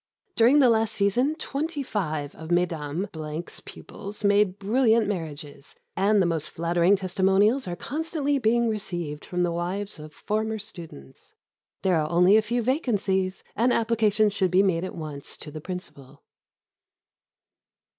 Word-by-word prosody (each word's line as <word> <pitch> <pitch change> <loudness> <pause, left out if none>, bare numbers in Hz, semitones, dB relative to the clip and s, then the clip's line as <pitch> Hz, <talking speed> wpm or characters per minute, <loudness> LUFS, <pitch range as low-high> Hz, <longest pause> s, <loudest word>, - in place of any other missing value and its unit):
During 240 +5 +5
the 265 -4 +6
last 225 -1 +2
season 245 +9 +1
twenty 300 -1 -3
five 155 - -3
of 160 0 -10
Mesdames 165 -1 -2
pupils 205 +2 -9
made 200 -2 +3
brilliant 225 +1 +2
marriages, 155 -7 -6 0.2
and 200 +2 +3
the 185 - +3
most 165 -3 -1
flattering 170 +3 +2
testimonials 195 +5 +2
are 175 - -3
constantly 290 - -2
being 235 0 +2
received 175 -9 -3
from 180 0 -2
the 175 - +1
wives 180 +2 -3
of 150 0 -10
former 220 +5 -2
students. 170 - -11 0.5
There 185 -3 +3
are 155 -1 0
only 180 +4 +5
a 220 - +6
few 235 +3 -1
vacancies, 205 - 0
and 240 +3 +2
application 220 -2 +2
should 195 -2 +1
be 185 +2 +4
made 175 -3 +1
at 185 - -5
once 150 -4 -6
to 150 - -7
the 155 +1 -7
Principal. 145 -6 -9
195 Hz, 145 wpm, -25 LUFS, 170-220 Hz, 0.5 s, the